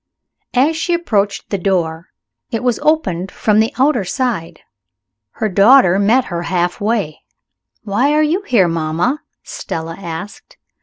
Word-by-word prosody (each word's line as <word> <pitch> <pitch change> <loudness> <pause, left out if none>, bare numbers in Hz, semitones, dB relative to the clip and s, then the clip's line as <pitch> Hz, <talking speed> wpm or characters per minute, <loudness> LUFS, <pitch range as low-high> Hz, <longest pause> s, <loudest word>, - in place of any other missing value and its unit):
As 285 +6 +3
she 340 +2 0
approached 210 -12 -1
the 200 - -1
door, 170 -3 -1 0.4
it 230 -1 -3
was 245 -2 0
opened 195 - 0
from 215 -1 +1
the 220 +1 +2
outer 265 -4 +2
side. 210 -4 -3 0.7
Her 220 - -2
daughter 200 -1 +5
met 235 +5 +3
her 170 -1 -4
half 175 +1 -1
way. 205 -8 -1 0.6
"Why 230 +7 +1
are 305 0 +3
you 325 +6 0
here, 235 - +2
mamma?" 165 - -1 0.2
Stella 165 0 -6
asked. 185 +2 -8
205 Hz, 140 wpm, -17 LUFS, 175-255 Hz, 0.7 s, daughter